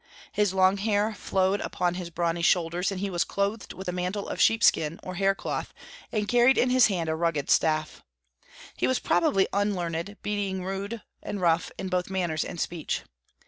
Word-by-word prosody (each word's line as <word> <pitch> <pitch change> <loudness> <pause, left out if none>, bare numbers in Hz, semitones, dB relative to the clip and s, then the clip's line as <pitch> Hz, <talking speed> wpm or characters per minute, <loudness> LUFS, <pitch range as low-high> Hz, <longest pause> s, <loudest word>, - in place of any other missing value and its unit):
His 205 -2 +1
long 190 +1 +3
hair 210 +1 +1
flowed 190 0 0
upon 175 -1 -1
his 180 -1 -5
brawny 170 0 -1
shoulders, 175 +1 +2
and 190 -1 -4
he 200 -1 -2
was 175 -1 +1
clothed 200 +2 -2
with 190 0 -8
a - - 0
mantle 180 +3 -3
of - - -3
sheepskin 165 -8 +3
or 185 - -6
hair 195 +2 +2
cloth, - - -4 0.4
and 210 -1 -1
carried 245 +3 +5
in 250 - +3
his 255 -1 +6
hand 175 -6 -2
a 160 - 0
rugged 160 -3 0
staff. 155 -1 +1 0.7
He 125 - 0
was 130 - +2
probably 190 +3 +2
unlearned, 195 -2 -1
being 200 -3 -2
rude 200 +4 -4 0.2
and 205 - -5
rough 170 -2 +2
in 190 - -4
both 180 0 -1
manners 175 -5 -1
and 175 - -7
speech. 170 -1 -3
185 Hz, 185 wpm, -27 LUFS, 170-205 Hz, 0.7 s, his